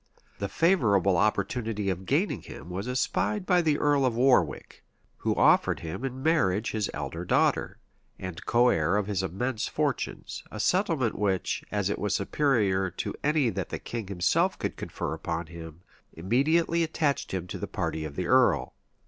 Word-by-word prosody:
[] - - -34
The 100 - -2
favorable 100 - +3
opportunity 105 +1 0
of 95 +1 -6
gaining - - +1
him 90 - -10
was 95 +5 -4
espied 155 +10 -1
by 180 -2 +4
the 155 -3 +2
earl 145 -2 +2
of 125 -3 +1
Warwick, 120 - +1 0.3
who - - -1
offered - - +4
him 80 +9 -6
in 130 0 -4
marriage 115 - +2
his 110 -2 -1
elder 75 +4 -5
daughter, - - +1 0.4
and 90 -1 -7
coheir 105 -7 +3
of 105 - 0
his 100 -2 -1
immense 105 +6 -2
fortunes; - - -3
a 110 - -8
settlement 165 - +1
which, 95 -3 0
as 105 -2 0
it 100 - -2
was 105 -2 0
superior 100 -5 +1
to 90 - -4
any 150 -5 +2
that - - -4
the - - -3
king 115 -4 -6
himself 90 -3 +1
could - - -3
confer - - -4
upon 85 0 -3
him, 80 0 -10 0.3
immediately 155 - +1
attached 155 -3 0
him 95 -2 -3
to 90 - -6
the - - -4
party 80 - -3
of 75 -2 -6
the 90 - -2
earl. 130 +7 +3
105 Hz, 170 wpm, -27 LUFS, 90-135 Hz, 0.4 s, by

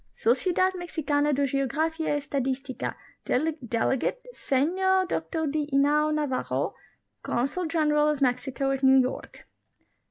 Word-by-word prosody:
Sociedad 360 - +1
Mexicana 300 -5 -1
de 280 0 +1
Geografia 295 +4 -1
y - - +1
Estadistica; 270 -2 -3 0.3
delegate, 265 - -1
Senor 375 - +1
Dr 320 -3 -2
D. 295 0 -1
Inau 295 +2 +3
N. 305 - 0
Navarro, 290 -4 -1 0.5
Consul 275 +9 -1
General 300 -2 +2
of 300 -2 -1
Mexico 265 +1 0
at 270 0 -2
New 265 0 +6
York. 255 0 -3
290 Hz, 120 wpm, -26 LUFS, 265-320 Hz, 0.5 s, New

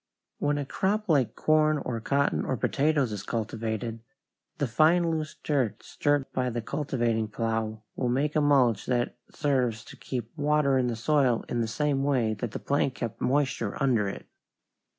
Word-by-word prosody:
When 145 0 +1
a 145 - -2
crop 210 +9 -1
like 140 -7 +2
corn 155 0 +3
or 125 -4 -3
cotton 140 +4 +1
or 130 - -1
potatoes 145 -3 +1
is 105 -2 -4
cultivated, 115 +1 -3 0.6
the 145 - 0
fine, 165 +7 +3
loose 155 -1 -3
dirt 135 -8 0
stirred 145 -2 0
by 125 -1 0
the 120 0 -3
cultivating 115 -3 -1
plow 110 0 -2
will 125 - -1
make 140 +5 0
a 155 - +4
mulch 130 -7 +3
that 120 -1 0
serves 125 -7 0
to - - -11
keep 120 -1 -6
water 145 -2 +2
in 125 - +1
the 120 - -1
soil 130 0 +2
in 120 - -1
the 115 - 0
same 140 +3 0
way 125 -6 +1
that 110 +3 -4
the - - -5
plank 140 -2 0
kept 115 -3 -5
moisture 130 -6 0
under 120 -7 +2
it. - - -8
130 Hz, 170 wpm, -27 LUFS, 115-145 Hz, 0.6 s, a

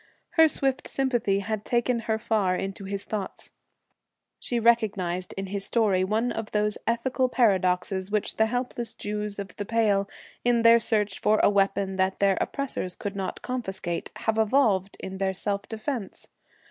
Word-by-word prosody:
Her 320 -2 +6
swift 270 -2 -1
sympathy 240 -7 +1
had 215 0 -3
taken 240 +1 +1
her 220 - +2
far 210 -4 +1
into 195 +1 -4
his 200 0 -3
thoughts. 205 -3 -4 0.9
She 240 - -2
recognized 200 -6 +1
in 195 - -2
his 195 +1 -3
story 200 -6 +2
one 220 +5 0
of 225 -1 -4
those 210 0 +1
ethical 255 +2 +1
paradoxes 190 -4 +2
which 210 0 -1
the 220 - +4
helpless 245 0 -3
Jews 210 0 -4
of 200 -3 -6
the 205 - -3
Pale, 205 -3 +2 0.3
in 240 -1 +3
their 230 0 +8
search 210 -4 +1
for 215 0 +3
a - - +6
weapon 195 -1 +1
that 190 0 +1
their 195 -1 +2
oppressors 255 -10 -3
could 205 -4 -5
not 195 -1 -4
confiscate, 190 -9 -4
have 225 0 -1
evolved 215 -5 +2
for - - -6
their 190 0 -1
self 200 +1 -2
defence. 220 -1 -4
210 Hz, 160 wpm, -26 LUFS, 195-235 Hz, 0.9 s, their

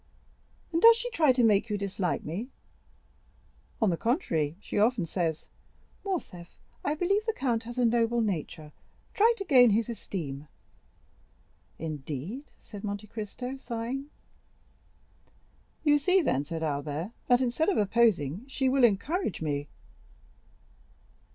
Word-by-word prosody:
"And 330 - +1
does 460 0 +9
she - - -4
try 315 - +4
to 250 -1 +2
make 215 0 +3
you 210 - 0
dislike 195 -2 -2
me?" 195 - -5 1.3
"On 220 -5 +3
the 170 - -1
contrary, 170 - 0
she 205 - -3
often 220 -3 +2
says, 165 -2 -2 0.6
'Morcerf, 185 - -5 0.3
I 295 - 0
believe 395 +7 0
the 450 - +1
count 235 -4 -1
has 240 +1 -8
a 250 - +3
noble 235 0 +2
nature; 165 -7 -3 0.4
try 445 +3 +5
to 395 - -5
gain 255 -7 +7
his 220 +2 +1
esteem.'" 155 -10 -5 1.3
"Indeed?" 155 - -6
said 205 -3 -10
Monte 205 0 -4
Cristo, 230 +5 -6
sighing. 245 +2 -4 1.8
"You 295 -1 +4
see, 365 +6 +3
then," 140 - 0
said 165 +1 -4
Albert, 150 +5 -3 0.2
"that 245 0 +4
instead 260 +8 +1
of 390 - +1
opposing, 200 - +2
she 270 0 -1
will 265 0 +2
encourage 240 - +1
me." 145 -2 -2
225 Hz, 130 wpm, -28 LUFS, 170-270 Hz, 1.8 s, does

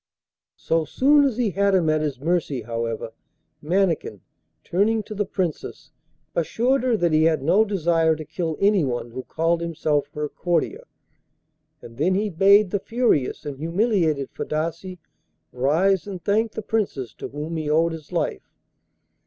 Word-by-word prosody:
So 165 0 0
soon 285 - +4
as 255 -5 -1
he 235 -5 +1
had 200 +1 +2
him 175 -4 +2
at 155 0 +2
his 145 -4 -3
mercy, 150 -5 -1
however, 115 0 -4 0.5
Mannikin, 170 - 0 0.4
turning 215 +4 +1
to 215 - -8
the 205 -1 -2
Princess, 180 -5 -4 0.4
assured 240 - +1
her 245 -3 +1
that 175 -4 +1
he 155 +1 +4
had 160 -4 +2
no 190 +9 +4
desire 165 -5 +1
to 155 0 -8
kill 160 +1 -3
anyone 150 - +1
who 130 +2 -5
called 165 +5 -1
himself 155 -3 -1
her 150 0 -2
courtier, 270 - -2 1.0
and 115 0 -12
then 180 +5 +2
he 205 +1 0
bade 195 +3 +5
the 200 - 0
furious 225 - 0
and 140 -2 -6
humiliated 165 - 0
Fadasse 165 +4 -4 0.5
rise 160 +9 +1
and 185 -4 -7
thank 220 +2 +1
the 220 - -5
Princess 195 - -2
to - - -7
whom 150 +3 -6
he 155 -2 -3
owed 165 +2 +3
his 160 -2 -9
life. - - -2
170 Hz, 155 wpm, -23 LUFS, 150-200 Hz, 1.0 s, bade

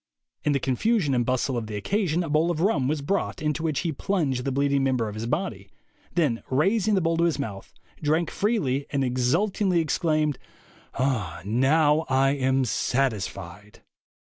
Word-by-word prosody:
In 150 - +2
the 140 - +1
confusion 150 - +1
and 120 -1 +2
bustle 130 +1 0
of 115 -2 -3
the 105 - -5
occasion 175 - 0
a 165 - -5
bowl 155 +3 +2
of 170 -3 -1
rum 165 -8 +2
was 145 0 -1
brought, 200 +5 -1
into 150 0 -1
which 155 -4 -1
he 170 - -1
plunged 140 -6 -1
the 135 - 0
bleed 140 +1 +1
ing 140 -1 +2
member 130 -4 +1
of 105 - -5
his 110 +2 -5
body, 120 - -3 0.5
then 145 -9 +1
raising 195 - +2
the 190 - +2
bowl 165 0 +1
to 170 - +3
his 170 - +1
mouth, 105 -9 -6 0.3
drank 155 +2 +1
freely, 145 - 0
and 140 -2 0
exultingly 170 +10 +1
exclaimed, 155 -3 0 0.6
'Now 135 - +1
I 135 +1 +3
am 130 -1 +1
satisfied.' 105 -6 -2
140 Hz, 170 wpm, -25 LUFS, 130-165 Hz, 0.6 s, to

